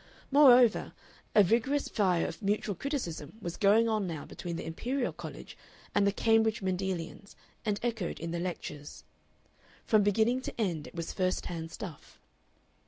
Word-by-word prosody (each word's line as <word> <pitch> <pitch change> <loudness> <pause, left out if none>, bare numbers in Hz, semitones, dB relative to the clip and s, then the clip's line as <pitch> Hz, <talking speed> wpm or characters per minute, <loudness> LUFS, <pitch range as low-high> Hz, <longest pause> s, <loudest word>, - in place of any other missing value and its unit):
Moreover, 255 -5 +6 0.4
a 210 - +8
vigorous 240 +9 +1
fire 185 -6 +1
of - - -6
mutual 205 0 0
criticism 230 - -4
was 175 -5 -5
going 215 +2 +4
on 215 -4 0
now 160 -4 -5
between 170 -1 -6
the - - -5
Imperial 245 +11 -2
College - - -9 0.4
and 200 0 +3
the - - +3
Cambridge 225 0 +2
Mendelians 185 0 -3 0.3
and 205 -1 0
echoed 220 -7 -2
in 165 +1 -4
the 170 - -2
lectures. 155 -4 -6 0.8
From 215 -2 +4
beginning 220 +5 +2
to 260 - -7
end 170 -8 -1
it - - -13
was 165 -1 -4
first 185 -1 0
hand 165 -2 -5
stuff. 170 -6 -9
200 Hz, 155 wpm, -30 LUFS, 175-225 Hz, 0.8 s, a